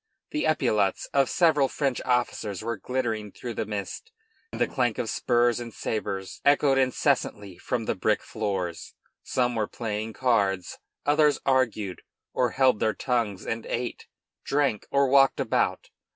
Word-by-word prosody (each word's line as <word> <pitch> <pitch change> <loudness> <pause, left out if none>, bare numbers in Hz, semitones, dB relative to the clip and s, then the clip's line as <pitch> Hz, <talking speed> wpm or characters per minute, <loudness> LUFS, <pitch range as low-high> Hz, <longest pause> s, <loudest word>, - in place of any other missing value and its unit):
The 305 - 0
epaulets 115 -11 +1
of 135 -2 +3
several 155 -6 +4
French 135 -2 -1
officers 115 -5 -1
were 115 +1 -2
glittering 110 -1 -3
through 120 +3 -6
the 110 - -3
mist, 100 -3 -5 0.4
and - - -7
the - - +4
clank - - 0
of - - -2
spurs 120 0 +2
and 120 -1 -6
sabres 95 -4 -4
echoed 140 -1 +4
incessantly 125 -7 0
from 120 -3 -2
the - - 0
brick 105 +3 0
floor. 95 -5 -2 0.5
Some 125 -1 0
were 110 -3 -1
playing 110 -1 -4
cards, 100 -8 0 0.3
others 150 -1 +4
argued, 115 -8 +1 0.3
or 125 -1 +2
held 130 -2 +3
their 110 - +1
tongues 115 -7 -1
and 115 0 -3
ate, 120 0 -4 0.4
drank, 140 -7 0
or 140 0 +3
walked 135 0 +5
about. - - 0
120 Hz, 150 wpm, -26 LUFS, 105-135 Hz, 0.5 s, walked